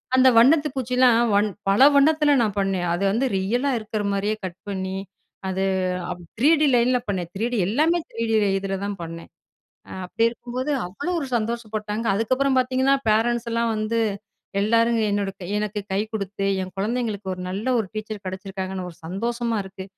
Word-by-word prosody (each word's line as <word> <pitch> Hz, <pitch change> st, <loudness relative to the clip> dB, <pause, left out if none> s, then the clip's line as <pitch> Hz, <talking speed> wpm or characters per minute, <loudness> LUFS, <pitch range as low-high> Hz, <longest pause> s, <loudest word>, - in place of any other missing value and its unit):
அந்த 260 Hz, 0 st, +7 dB
வண்ணத்து 290 Hz, +6 st, +6 dB
பூச்சிலாம் 250 Hz, -2 st, +3 dB
வண் 205 Hz, +1 st, +4 dB, 0.2 s
பல 200 Hz, +6 st, +5 dB
வண்ணத்தில 300 Hz, +1 st, +4 dB
நான் 210 Hz, -3 st, 0 dB
பண்ணேன். 190 Hz, -2 st, 0 dB
அது 175 Hz, +3 st, -1 dB
வந்து 235 Hz, +6 st, +1 dB
ரியலா 235 Hz, +9 st, 0 dB
இருக்கிறமாரியே 210 Hz, -1 st, -1 dB
கட் 185 Hz, -1 st, -6 dB
பண்ணி, 190 Hz, -1 st, -3 dB, 0.5 s
அது 190 Hz, +1 st, -1 dB, 0.8 s
3D 305 Hz, +4 st, +5 dB
லைன்ல 245 Hz, +1 st, +3 dB
பண்ணேன். 185 Hz, -4 st, -2 dB
3D 235 Hz, +4 st, -1 dB
எல்லாமே 310 Hz, -, +2 dB
3D 230 Hz, -1 st, -2 dB, 0.3 s
இதில 195 Hz, 0 st, -3 dB
தான் 200 Hz, -1 st, -4 dB
பண்ணேன். 165 Hz, 0 st, -8 dB, 0.6 s
அ -, -, -10 dB
அப்பிடி 225 Hz, +5 st, 0 dB
இருக்கும்போது, 245 Hz, +4 st, -5 dB, 0.2 s
அவ்ளோ 285 Hz, -, -4 dB
ஒரு 280 Hz, -, -3 dB
சந்தோஷப்பட்டாங்க. 220 Hz, -1 st, -3 dB
அதுக்கப்புறம் 255 Hz, +6 st, +1 dB
பார்த்தீங்கன்னா, 260 Hz, +2 st, +2 dB, 0.2 s
பேரன்ட்ஸ் 235 Hz, +2 st, +1 dB
எல்லாம் 230 Hz, 0 st, +1 dB
வந்து 215 Hz, +2 st, -1 dB, 0.6 s
எல்லாரும் 230 Hz, +2 st, +3 dB
என்னோட 200 Hz, -1 st, 0 dB, 0.3 s
எனக்கு 210 Hz, 0 st, -2 dB
கை 195 Hz, -, +1 dB
குடுத்து, 200 Hz, -2 st, -3 dB, 0.2 s
என் 185 Hz, 0 st, -7 dB
குழந்தைங்களுக்கு 215 Hz, -1 st, -2 dB
ஒரு, 180 Hz, -, -9 dB
நல்ல 200 Hz, +5 st, -4 dB
ஒரு 220 Hz, -, -1 dB
டீச்சர் 215 Hz, -1 st, -6 dB
கிடைச்சிருக்காங்கன்னு 190 Hz, 0 st, -5 dB
ஒரு 165 Hz, -, -16 dB
சந்தோஷமா 230 Hz, +5 st, -2 dB
இருக்கு. 190 Hz, 0 st, -9 dB
220 Hz, 150 wpm, -23 LUFS, 195-245 Hz, 0.8 s, அந்த